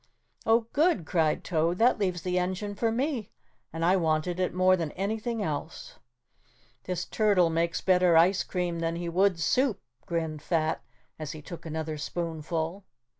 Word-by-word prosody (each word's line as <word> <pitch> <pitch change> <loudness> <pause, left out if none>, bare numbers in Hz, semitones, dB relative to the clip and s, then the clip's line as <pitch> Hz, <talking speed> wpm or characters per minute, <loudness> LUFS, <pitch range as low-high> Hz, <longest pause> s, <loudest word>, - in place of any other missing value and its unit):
"Oh, 225 +1 +5
good," 300 - +2
cried 160 -3 +1
Toad, 170 +1 0
"that 235 +2 +4
leaves 180 -5 -1
the 180 0 0
engine 185 +3 -2
for 225 +2 0
me 250 -2 -1 0.4
and 165 +1 -2
I 185 +2 +4
wanted 165 +1 0
it 185 - +1
more 185 +1 +4
than 165 -4 -2
anything 215 +3 -2
else." 155 -1 -5 0.9
"This 180 -1 -2
turtle 200 -6 +3
makes 170 +1 0
better 180 -3 +4
ice 185 +4 +4
cream 175 -2 -2
than 165 0 -1
he 170 0 -3
would 185 0 +2
soup," 250 +5 +2 0.3
grinned 160 -3 -2
Fat 160 -1 0 0.4
as 155 0 -5
he 155 - -9
took 170 +1 -8
another 160 -1 -3
spoonfull. 165 +3 -3
175 Hz, 160 wpm, -28 LUFS, 165-195 Hz, 0.9 s, Oh